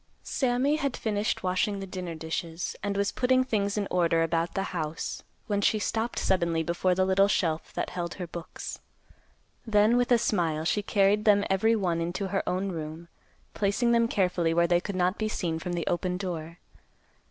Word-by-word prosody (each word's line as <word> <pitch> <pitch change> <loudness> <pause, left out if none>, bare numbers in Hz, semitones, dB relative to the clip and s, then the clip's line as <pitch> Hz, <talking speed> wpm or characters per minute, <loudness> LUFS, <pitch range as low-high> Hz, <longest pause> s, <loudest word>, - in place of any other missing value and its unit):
Sammy 265 +3 +1
had 280 -4 -2
finished 210 0 -1
washing 185 +2 0
the 195 - -5
dinner 180 -3 -5
dishes, 160 +2 -4
and 200 0 -2
was 200 0 +1
putting 255 0 +3
things 205 -4 -1
in 205 -1 0
order 170 -2 +3
about 165 +1 -1
the 195 - 0
house, 160 -2 -3 0.2
when 205 -3 0
she 215 - +3
stopped 225 +2 -2
suddenly 170 -3 +1
before 175 +2 +1
the 185 +1 +2
little 195 +1 +4
shelf 165 -5 0
that - - -3
held 175 -1 -4
her 180 - -5
books. 170 0 -7 0.8
Then, 215 +1 +4
with 245 0 +1
a 240 - +7
smile, 165 -8 0
she 210 - +1
carried 205 +1 +2
them 205 -2 +5
every 220 +4 +3
one 175 -5 0
into 175 +3 -2
her 195 - 0
own 190 +2 -1
room, 160 0 -6 0.4
placing 210 +4 +1
them 230 0 +4
carefully 180 -6 +1
where 170 0 +4
they 175 0 +3
could 200 0 -5
not 185 +2 +1
be 215 - 0
seen 165 -6 -2
from 175 +2 -4
the 170 -1 -2
open 180 +1 -1
door. 170 -3 -5
185 Hz, 185 wpm, -28 LUFS, 170-210 Hz, 0.8 s, a